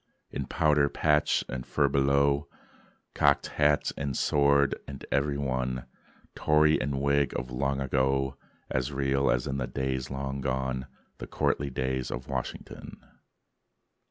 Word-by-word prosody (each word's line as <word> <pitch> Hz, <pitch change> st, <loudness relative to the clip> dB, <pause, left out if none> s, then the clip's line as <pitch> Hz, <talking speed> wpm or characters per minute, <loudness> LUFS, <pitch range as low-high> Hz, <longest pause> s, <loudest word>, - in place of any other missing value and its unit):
In 70 Hz, -, -4 dB
powder, 75 Hz, -3 st, +3 dB
patch, 75 Hz, 0 st, +2 dB
and 65 Hz, -1 st, -4 dB
furbelow, 70 Hz, 0 st, +2 dB, 0.7 s
Cocked 70 Hz, -1 st, +3 dB
hat 75 Hz, -1 st, +2 dB
and 70 Hz, -1 st, -3 dB
sword; 70 Hz, -1 st, +3 dB
and 70 Hz, -1 st, -8 dB
every 70 Hz, 0 st, +1 dB
one, 65 Hz, -2 st, -2 dB, 0.5 s
Tory 75 Hz, 0 st, +3 dB
and 70 Hz, 0 st, -1 dB
Whig 70 Hz, -1 st, +1 dB
of 65 Hz, -1 st, -5 dB
long 70 Hz, +2 st, -1 dB
ago, 65 Hz, 0 st, +1 dB, 0.3 s
As 65 Hz, +2 st, -1 dB
real 70 Hz, 0 st, +1 dB
as -, -, +1 dB
in 70 Hz, -, -2 dB
the 65 Hz, -2 st, -2 dB
days 65 Hz, -1 st, -2 dB
long 70 Hz, 0 st, -4 dB
done, 65 Hz, 0 st, -2 dB, 0.3 s
The -, -, -6 dB
courtly 70 Hz, 0 st, 0 dB
days 65 Hz, 0 st, -2 dB
of 65 Hz, +2 st, -5 dB
Washington. -, -, -6 dB
70 Hz, 130 wpm, -28 LUFS, 65-70 Hz, 0.7 s, powder